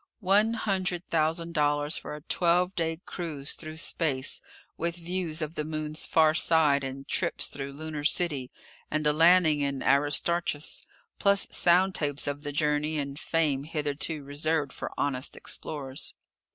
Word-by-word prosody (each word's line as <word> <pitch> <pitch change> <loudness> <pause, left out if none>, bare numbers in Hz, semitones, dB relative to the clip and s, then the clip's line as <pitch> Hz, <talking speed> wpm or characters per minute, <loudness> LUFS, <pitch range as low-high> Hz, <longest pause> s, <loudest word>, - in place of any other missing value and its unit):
One 210 +3 +3
hundred 185 -5 -1
thousand 165 +1 0
dollars 145 -1 +1
for - - -5
a 150 - -10
twelve 180 +3 +1
day 165 -2 -2
cruise 155 -5 -4
through 155 0 -8
space, 140 -5 0 0.3
with 170 0 -2
views 170 -2 -2
of 155 +1 -5
the 150 - -3
Moon's 155 0 0
far 155 -1 +4
side 155 -4 +3
and 135 +1 -6
trips - - +1
through 140 0 -6
Lunar 155 0 -6
City 145 -5 +1 0.4
and 155 0 -1
a 150 - +4
landing 165 -1 +5
in 140 -1 -2
Aristarchus, 145 +2 +1 0.4
plus 200 0 +3
sound 185 +2 +4
tapes 145 -4 -1
of 145 0 -2
the 145 -1 -5
journey 150 +1 0
and 140 0 -4
fame 150 -5 0
hitherto 150 0 -2
reserved 145 0 -1
for - - -6
honest 135 -1 -1
explorers! 135 -3 -5
155 Hz, 150 wpm, -28 LUFS, 145-170 Hz, 0.4 s, landing